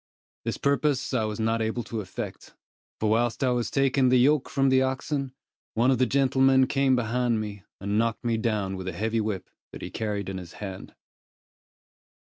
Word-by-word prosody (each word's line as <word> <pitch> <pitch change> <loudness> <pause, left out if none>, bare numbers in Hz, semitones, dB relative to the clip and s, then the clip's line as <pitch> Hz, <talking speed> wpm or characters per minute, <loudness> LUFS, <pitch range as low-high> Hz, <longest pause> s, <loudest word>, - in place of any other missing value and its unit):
This - - -2
purpose 140 -1 +1
I 115 -4 +1
was 105 0 -4
not 115 +1 +1
able 110 +2 -1
to 110 0 -4
effect, 95 - -7 0.4
for 110 - +1
whilst 115 +4 +1
I 130 - +3
was 120 -1 0
taking 135 -1 +3
the 130 - +5
yoke 135 +3 +3
from 135 -1 +2
the 130 0 +4
oxen, 135 +1 -1 0.4
one 120 +4 +4
of 130 - +1
the 130 - +3
gentlemen 135 0 +4
came 135 0 +2
behind 120 -1 0
me, 105 -2 -6
and 100 +2 0
knocked 115 +1 0
me 115 -1 +1
down 105 -4 -1
with 95 0 -6
a 95 - -3
heavy 110 +5 0
whip, 105 -3 -3 0.2
that - - -9
he - - -6
carried 105 -3 -3
in 95 -1 -4
his 90 -2 -10
hand. 95 -2 -8
115 Hz, 190 wpm, -26 LUFS, 110-130 Hz, 0.4 s, the